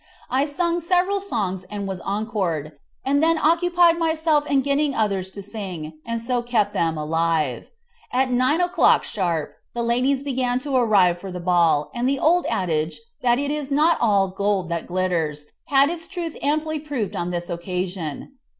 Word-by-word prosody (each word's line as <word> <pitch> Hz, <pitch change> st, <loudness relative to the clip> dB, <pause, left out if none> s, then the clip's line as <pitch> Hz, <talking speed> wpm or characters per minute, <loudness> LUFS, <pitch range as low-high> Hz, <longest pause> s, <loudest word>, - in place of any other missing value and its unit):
I 270 Hz, +3 st, +2 dB
sang 340 Hz, +3 st, 0 dB
several 365 Hz, +4 st, +1 dB
songs 205 Hz, -, -2 dB
and 205 Hz, -1 st, -4 dB
was 190 Hz, -2 st, -5 dB
encored, 195 Hz, -8 st, -2 dB, 0.3 s
and 280 Hz, +2 st, +2 dB
then 325 Hz, 0 st, +3 dB
occupied 340 Hz, +1 st, +3 dB
myself 320 Hz, -2 st, +1 dB
in 275 Hz, -1 st, +3 dB
getting 280 Hz, +1 st, 0 dB
others 195 Hz, -4 st, 0 dB
to 200 Hz, +1 st, -9 dB
sing, 185 Hz, -7 st, -6 dB
and 230 Hz, 0 st, -3 dB
so 240 Hz, +1 st, -1 dB
kept 235 Hz, -3 st, 0 dB
them 165 Hz, -1 st, 0 dB
alive. 155 Hz, -3 st, 0 dB, 0.4 s
At 260 Hz, 0 st, +1 dB
9 255 Hz, +7 st, +2 dB
o'clock 355 Hz, 0 st, +4 dB
sharp 170 Hz, -7 st, -2 dB, 0.2 s
the 235 Hz, -, -1 dB
ladies 255 Hz, +4 st, +1 dB
began 255 Hz, -3 st, 0 dB
to 275 Hz, 0 st, -3 dB
arrive 200 Hz, -8 st, +4 dB
for 190 Hz, +1 st, -7 dB
the 180 Hz, -, -5 dB
ball, 170 Hz, -4 st, +2 dB
and 245 Hz, +2 st, 0 dB
the 275 Hz, -, +1 dB
old 345 Hz, +5 st, +3 dB
adage 160 Hz, -4 st, -1 dB, 0.2 s
that 240 Hz, -1 st, +3 dB
"it 285 Hz, +1 st, -1 dB
is 295 Hz, -2 st, -3 dB
not 305 Hz, +4 st, +3 dB
all 200 Hz, -4 st, +3 dB
gold 195 Hz, -2 st, -1 dB
that 170 Hz, -1 st, -3 dB
glitters" 170 Hz, -5 st, -1 dB, 0.2 s
had 280 Hz, +2 st, +4 dB
its 335 Hz, -1 st, -6 dB
truth 345 Hz, -4 st, -5 dB
amply 310 Hz, +2 st, 0 dB
proved 285 Hz, -9 st, -4 dB
on 175 Hz, -, -2 dB
this 175 Hz, -1 st, -3 dB
occasion. 180 Hz, -, -4 dB
235 Hz, 170 wpm, -23 LUFS, 180-290 Hz, 0.4 s, o'clock